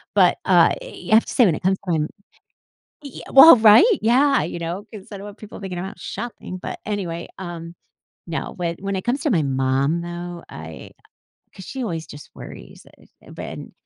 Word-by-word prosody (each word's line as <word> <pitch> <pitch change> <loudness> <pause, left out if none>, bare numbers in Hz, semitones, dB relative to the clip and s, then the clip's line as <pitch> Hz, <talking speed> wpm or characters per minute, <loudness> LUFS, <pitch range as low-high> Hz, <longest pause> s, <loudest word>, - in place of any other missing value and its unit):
But, - - +4
uh, - - +5
you - - -9
have 220 - +6
to - - -7
say 245 - +5
when 175 - +3
it - - -7
comes 190 +1 +1
to 180 - -2
when 155 -2 0 1.0
Ye 280 -3 -9
well, 270 +2 +10
right? 220 - +7 0.2
Yeah, 255 - +3
you 170 +2 -5
know, 170 +4 -5
'cause 210 0 -11
I 205 - -7
don't 195 - -9
want 205 +1 -10
people 215 - -11
thinking 185 -3 -6
I'm 185 - -4
out 195 - -10
shopping, 230 -6 -7
but - - -6
anyway, 175 -5 -4
um, 170 -2 -7 0.5
now 165 -2 -4
when 170 -1 -4
when 195 0 -3
it 185 - -3
comes 260 +4 -1
to 305 - +1
my 170 -7 +2
mom 135 +3 0
though, 175 0 -7
I 80 0 -10 0.7
'cause 190 - -10
she 270 -3 -6
always 165 -8 -4
just 145 -1 -12
worries, - - -12
eh, - - -21 0.2
but - - -8
and - - -9
185 Hz, 205 wpm, -21 LUFS, 165-215 Hz, 1.0 s, well